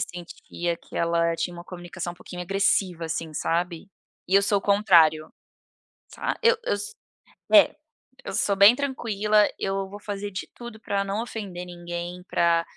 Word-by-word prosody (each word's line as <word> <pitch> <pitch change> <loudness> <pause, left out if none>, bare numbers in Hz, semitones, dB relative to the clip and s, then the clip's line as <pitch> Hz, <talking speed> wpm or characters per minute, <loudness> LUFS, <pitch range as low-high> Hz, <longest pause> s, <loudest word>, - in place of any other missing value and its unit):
sentia 175 0 -5
que - - -18
ela 170 0 +1
tinha 175 +1 -3
uma 170 - -9
comunicação 175 -1 -7
um - - -17
pouquinho 180 0 -8
agressiva 185 -2 +1
assim, 160 0 -4
sabe? 170 +3 -2 0.4
E 190 - +1
eu 200 - +6
sou 200 0 +2
o - - -8
contrário, 170 -7 +4 0.8
sab - - -3
Eu 470 +1 +5
eu - - 0
s 205 0 -6 0.6
é, 310 -2 +7 0.5
eu - - -6
sou 200 - +1
bem 200 +4 +8
tranquila, 215 -6 +1
eu 195 0 -2
vou 205 +1 -9
fazer 205 0 -5
de 185 - -5
tudo 240 -2 -10
para 200 -2 -1
não 200 +3 -2
ofender 195 -7 -6
ninguém 175 0 -6
pra, 170 -1 +2
190 Hz, 165 wpm, -25 LUFS, 175-205 Hz, 0.8 s, bem